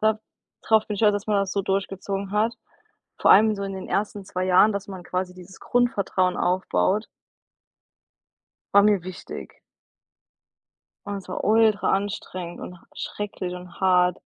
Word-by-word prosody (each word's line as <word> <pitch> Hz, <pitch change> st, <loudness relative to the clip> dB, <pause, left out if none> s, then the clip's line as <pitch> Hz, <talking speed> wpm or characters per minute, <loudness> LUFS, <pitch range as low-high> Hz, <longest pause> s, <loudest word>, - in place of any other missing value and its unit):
Da 215 Hz, 0 st, +2 dB, 0.4 s
drauf 220 Hz, -1 st, +3 dB
bin 210 Hz, -, -3 dB
ich 200 Hz, -, -6 dB
stolz, 210 Hz, -2 st, +5 dB
dass 205 Hz, 0 st, -3 dB
man 210 Hz, -1 st, +2 dB
das 195 Hz, -1 st, -1 dB
so 200 Hz, -, 0 dB
durchgezogen 195 Hz, 0 st, -2 dB
hat, 220 Hz, +3 st, +1 dB, 0.6 s
vor -, -, +4 dB
allem 215 Hz, +2 st, +6 dB
so 200 Hz, -, -5 dB
in 195 Hz, 0 st, -4 dB
den 190 Hz, -, -7 dB
ersten 205 Hz, -1 st, -2 dB
2 185 Hz, 0 st, -3 dB
Jahren, 185 Hz, +4 st, +5 dB
dass 200 Hz, 0 st, -5 dB
man 190 Hz, -2 st, -7 dB
quasi 180 Hz, 0 st, -3 dB
dieses 185 Hz, +1 st, -14 dB
Grundvertrauen 200 Hz, -7 st, +1 dB
aufbaut 190 Hz, +3 st, +1 dB, 1.7 s
war 200 Hz, -, +7 dB
mir 205 Hz, -4 st, +3 dB
wichtig. 185 Hz, 0 st, -9 dB, 1.5 s
Und 205 Hz, -1 st, -4 dB
es 195 Hz, -, -9 dB
war 185 Hz, -, -4 dB
ultra 220 Hz, 0 st, +3 dB
anstrengend 190 Hz, -3 st, -3 dB
und 180 Hz, -, -8 dB
h -, -, -25 dB
schrecklich 195 Hz, -3 st, -5 dB
und 180 Hz, -1 st, -11 dB
hart. 180 Hz, -1 st, +3 dB
195 Hz, 160 wpm, -24 LUFS, 185-210 Hz, 1.7 s, war